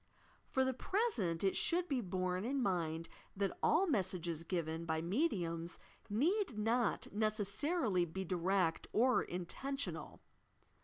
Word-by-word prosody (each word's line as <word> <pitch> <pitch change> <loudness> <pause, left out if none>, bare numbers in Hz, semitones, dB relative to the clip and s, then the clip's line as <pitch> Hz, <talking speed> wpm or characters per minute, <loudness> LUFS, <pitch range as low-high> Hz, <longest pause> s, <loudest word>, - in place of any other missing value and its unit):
For 265 0 +2
the 260 - +1
present 245 - 0
it 195 - +2
should 350 +1 +2
be 270 -6 0
borne 185 -1 -1
in 270 +4 0
mind 165 -5 0 0.3
that 195 -2 0
all 345 +5 +4
messages 185 - 0
given 165 -2 -2
by 160 -1 -1
mediums 170 - -1 0.3
need 310 - +1
not 225 +1 +1
necessarily 215 - +1
be 190 +3 -4
direct 180 -1 +1
or 250 +3 +4
intentional. 270 +11 -3
195 Hz, 120 wpm, -37 LUFS, 175-260 Hz, 0.3 s, all